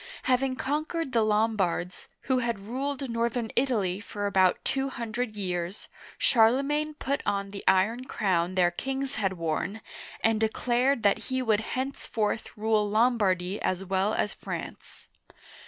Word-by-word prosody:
Having 260 +1 +2
conquered 305 +2 -2
the 235 -3 +3
Lombards, 210 -5 0
— - - -51
who 260 -1 +1
had 235 -3 -1
ruled 270 +7 -3
northern 235 -1 -1
Italy 210 -8 +1
for 205 0 -5
about 190 -2 +4
two 270 0 0
hundred 235 -2 -4
years, 180 -1 -3
— - - -18
Charle 235 +3 +4
magne 300 +2 -1
put 280 -1 -2
on 200 0 -1
the 200 - -7
iron 220 +7 +3
crown 185 -6 0
their 175 -2 +4
kings 270 +3 -3
had 195 -2 +1
worn, 165 +4 -2 0.4
and 225 -1 +3
declared 240 +3 +1
that 200 -1 +2
he 260 0 0
would 220 -3 +3 0.2
henceforth 230 -5 -2
rule 215 -1 +2
LomlDardy 205 -4 +2
as 185 +1 -1
well 195 +3 +1
as 210 - 0
France. - - -7
220 Hz, 150 wpm, -28 LUFS, 195-255 Hz, 0.4 s, about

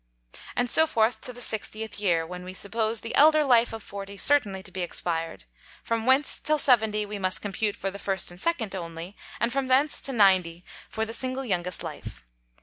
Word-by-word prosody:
And 245 - 0
so 320 +6 +6
forth 220 -4 0
to - - -4
the 245 0 -11
60th 220 -1 -3
Year, 170 -5 +1
when 180 +2 -8
we 185 +1 -9
suppose 220 +3 -1
the 230 - -5
elder 310 +1 +5
Life 240 -3 +3
of 225 -1 -8
Forty 200 0 -8
certainly 200 -6 +3
to 190 - -8
be 185 0 -5
expired; 165 - -3 0.4
from 230 0 -2
whence 265 +3 +2
till 305 0 +1
Seventy 220 -6 +3
we 205 0 -6
must 185 -1 0
compute 205 +1 -2
for 195 - -4
the 200 - -9
First 190 -3 -1
and 175 - -12
Second 250 - -1
only, 170 +1 -7 0.2
and 235 +2 0
from 275 -1 -1
thence 270 +3 +3
to 275 - -1
Ninety 185 -6 +2 0.2
for 220 0 -2
the 225 - -7
single 260 +2 -1
youngest 180 -4 -1
Life. - - -9
215 Hz, 200 wpm, -26 LUFS, 185-245 Hz, 0.4 s, so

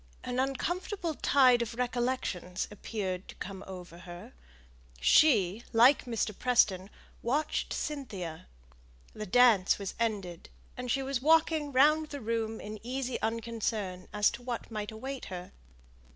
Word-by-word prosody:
An 250 0 -2
uncomfortable 340 +6 -2
tide 255 -4 +4
of 230 -1 -3
recollections 240 -7 -2
appeared 195 -3 -4
to - - -10
come 195 0 -7
over 180 -2 -9
her; 175 -1 -10 0.7
she, 210 - +4
like 245 +5 +6
Mr. 225 -3 -2
Preston, 200 -7 +2 0.3
watched 290 +6 -1
Cynthia; 200 - -5 0.7
the 215 0 -6
dance 220 -3 +5
was 200 -2 -5
ended, 200 -7 -2 0.3
and 250 0 -5
she 270 +2 +1
was 265 -2 -2
walking 315 0 +3
round 305 +4 +4
the 285 - -6
room 225 -1 -2
in 215 +1 -7
easy 255 +1 -3
unconcern 220 -4 -2
as 210 0 +3
to 235 - -8
what 240 -1 -5
might 210 -1 -4
await 260 +5 -6
her. 180 -1 -7
230 Hz, 135 wpm, -30 LUFS, 195-260 Hz, 0.7 s, like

